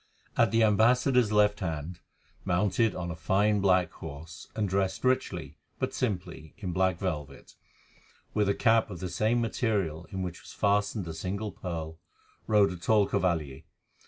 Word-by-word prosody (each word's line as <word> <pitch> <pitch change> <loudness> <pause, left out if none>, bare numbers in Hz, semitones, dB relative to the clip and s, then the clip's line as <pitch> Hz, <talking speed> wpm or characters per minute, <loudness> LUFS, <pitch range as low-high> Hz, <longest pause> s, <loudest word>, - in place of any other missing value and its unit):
At 115 -2 +4
the 115 +2 +3
ambassador's 120 +2 +4
left 105 -1 +3
hand, 80 -1 -4 0.4
mounted 100 +4 +1
on 85 -1 -4
a - - -5
fine 100 +5 +2
black 95 -2 +3
horse, 80 +2 -9
and 105 -2 0
dressed 95 0 -1
richly, 130 0 -1 0.2
but - - -2
simply, 90 - -4
in 95 -4 -4
black 95 0 +1
velvet, 75 -7 -5 0.8
with 105 -2 +2
a 100 - +2
cap 115 -2 +3
of 90 -4 -7
the 90 - -4
same 110 +6 +1
material 100 -8 -1
in 95 -1 -4
which 90 -2 -6
was - - -12
fastened 100 -1 +1
a 80 - -5
single 100 +6 -4
pearl, 80 -3 -6 0.5
rode 105 -3 +4
a 90 - -6
tall 105 +4 +3
cavalier. 80 -8 -1
95 Hz, 160 wpm, -29 LUFS, 85-105 Hz, 0.8 s, At